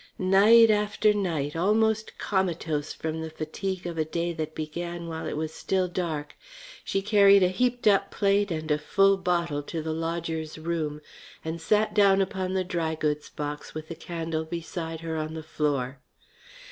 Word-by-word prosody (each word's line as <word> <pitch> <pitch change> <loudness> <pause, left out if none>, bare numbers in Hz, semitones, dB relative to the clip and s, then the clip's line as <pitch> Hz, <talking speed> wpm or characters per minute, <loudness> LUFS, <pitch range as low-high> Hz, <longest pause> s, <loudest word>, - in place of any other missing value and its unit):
Night 210 +5 +6
after 210 0 +2
night, 165 -8 -1
almost 220 +5 +1
comatose 165 -6 -1
from 160 0 -4
the 160 - -4
fatigue 175 +4 -4
of 170 -2 -4
a - - +3
day 170 +2 -2
that 155 -1 -5
began 170 +2 -5
while 160 -1 -5
it - - -3
was 155 0 -3
still 190 -1 0
dark, 165 -5 -3 0.5
she 195 - -1
carried 200 -2 +6
a 180 - +4
heaped 245 +5 0
up 200 -2 +4
plate 200 0 +2
and 155 -2 -3
a 150 - +2
full 195 +6 +4
bottle 170 -5 0
to 160 +3 -5
the 160 0 -3
lodger's 165 -1 -3
room 155 -2 -3 0.4
and 160 +1 -4
sat 210 +5 +2
down 200 -2 +5
upon 190 -1 -1
the 190 - +1
dry 165 -3 -2
goods 150 -1 -2
box 150 0 -6
with 155 0 -6
the 165 - -5
candle 165 -1 -3
beside 165 0 -5
her 165 -1 -3
on 155 0 -3
the 160 - -6
floor. 140 -4 -1
170 Hz, 170 wpm, -27 LUFS, 155-195 Hz, 0.5 s, Night